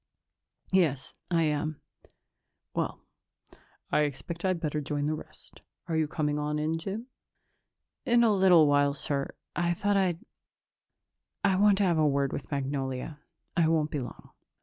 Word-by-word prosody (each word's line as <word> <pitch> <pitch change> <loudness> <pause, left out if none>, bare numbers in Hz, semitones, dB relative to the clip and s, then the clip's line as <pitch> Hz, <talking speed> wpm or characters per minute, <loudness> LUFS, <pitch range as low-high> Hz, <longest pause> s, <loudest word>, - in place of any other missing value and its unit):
"Yes, 160 -9 +1 0.2
I 170 -2 +2
am." 155 0 -1 0.9
"Well, - - -2 0.9
I - - +3
expect 150 +3 -2
I'd 185 -2 +1
better 150 -2 -2
join 145 0 -2
the 155 - 0
rest. 155 - -10 0.3
Are 165 - -1
you 160 -1 +2
coming 150 -1 -1
on 150 0 -1
in, 155 +2 -1
Jim?" 200 +7 -5 1.0
"In 240 0 +4
a 225 -2 +4
little 185 -5 +6
while, 145 -1 +3
sir. 140 -1 -2 0.2
I 175 0 +1
thought 205 +3 +1
I'd 180 -3 0 1.2
I 195 -2 +3
wanted 200 +1 +5
to 205 - +2
have 170 -4 +2
a 155 - +4
word 140 -1 +1
with 140 - -5
Magnolia. 135 +1 -3 0.4
I 170 -2 +3
won't 155 -2 +1
be 150 - -1
long." 120 -3 -9
155 Hz, 150 wpm, -29 LUFS, 145-180 Hz, 1.2 s, little